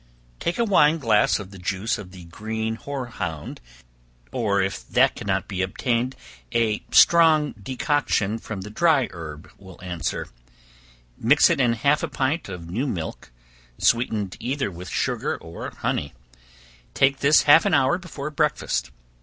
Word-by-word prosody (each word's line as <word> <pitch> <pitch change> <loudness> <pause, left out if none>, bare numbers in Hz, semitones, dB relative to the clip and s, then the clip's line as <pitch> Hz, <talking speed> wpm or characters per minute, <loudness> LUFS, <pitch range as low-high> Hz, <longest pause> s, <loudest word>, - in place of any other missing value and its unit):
Take 170 - -2
a 235 - +2
wine 165 -6 +4
glass 110 -8 +3
of 100 -2 -9
the 95 - -11
juice 95 +5 -2
of 95 -3 -9
the 90 -2 -12
green 110 +5 -4
hoarhound, 115 - -5 0.7
or 100 -4 0
if 95 0 -2
that - - +4
cannot - - -2
be 95 -2 -3
obtained, 120 +6 -1 0.4
a 115 -2 0
strong 160 -3 +6
decoction 125 -3 0
from 105 -4 -6
the 105 +2 -8
dry 150 0 +2
herb 80 0 -9
will 95 -2 -14
answer; 85 -4 -3 0.9
mix - - +5
it - - 0
in 120 -2 +3
half 140 +6 +2
a 165 - -1
pint 140 - -2
of 90 -3 -7
new 115 +12 -2
milk, 80 - -5 0.5
sweetened 110 -5 +1
either 130 -3 -2
with 90 0 -9
sugar - - -1
or 80 +1 -8
honey; 70 -3 -3 0.8
take 135 0 +3
this 150 +2 +5
half 150 +3 +7
an 185 - +3
hour 140 +6 +3
before 155 -5 -7
breakfast. 150 - -1
115 Hz, 150 wpm, -24 LUFS, 95-140 Hz, 0.9 s, half